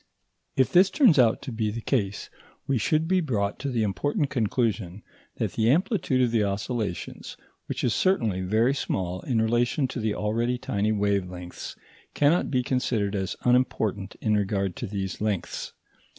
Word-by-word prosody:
If 130 - +2
this 185 +2 +6
turns 250 - +5
out 115 -3 +4
to 135 - -5
be 110 -2 -1
the 110 +2 -4
case, 105 -5 -2 0.3
we 135 -3 +1
should 155 +9 +1
be 185 +1 +3
brought 105 -10 -1
to 140 - -3
the 120 -4 0
important 140 - -1
conclusion 110 -5 -1 0.3
that - - -2
the 110 +1 +2
amplitude 165 - +2
of 120 - +1
the 115 -2 +2
oscillations, 100 -1 -3 0.3
which - - -4
is 120 - +2
certainly 115 - +1
very 110 +8 +2
small 95 -9 -2
in 120 -4 0
relation 120 +5 +1
to 130 - -4
the 110 -2 -1
already 115 +4 0
tiny 105 -4 -1
wave 100 -3 +1
lengths, 90 -1 -8 0.4
cannot 150 +5 +3
be 125 -2 +1
considered 120 -5 0
as 95 0 -2
unimportant 110 -6 +1
in 110 -1 +2
regard 100 -2 0
to - - -4
these 95 -1 -4
lengths. 105 -4 -2
110 Hz, 165 wpm, -26 LUFS, 100-130 Hz, 0.4 s, this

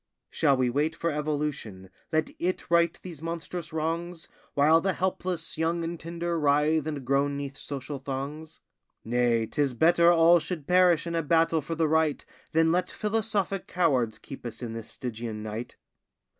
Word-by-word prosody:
Shall 140 -4 +3
we 130 -1 +2
wait 150 +5 0
for 170 0 -1
evolution, 145 -11 -3 0.2
let 155 0 +1
it 180 -1 -2
right 170 -1 +3
these 170 -5 -9
monstrous 165 0 -5
wrongs, 165 +2 -3 0.3
While 155 +3 +5
the 190 +1 +1
helpless, 180 -3 -2
young, 165 +1 0
and 165 0 -4
tender 170 0 -3
writhe 150 +1 +2
and 145 -4 -4
groan 140 +2 +1
'neath 140 -1 -5
social 140 0 -6
thongs? 140 +4 -6 0.4
Nay, 120 -1 +2
'tis 140 +2 -1
better 170 +4 +5
all 170 0 +6
should 155 -1 -5
perish 180 -2 +4
in 170 - -3
a 165 - +1
battle 165 +1 +2
for 165 +4 -4
the 160 -1 +2
right, 160 -1 +1 0.3
Than 160 0 +3
let 180 +1 +1
philosophic 210 -3 -1
cowards 130 -11 +1
keep 135 - -10
us 120 0 -7
in 115 -2 -4
this 115 -1 -7
stygian 115 -3 -5
night. 110 +2 -6
155 Hz, 165 wpm, -27 LUFS, 140-170 Hz, 0.4 s, all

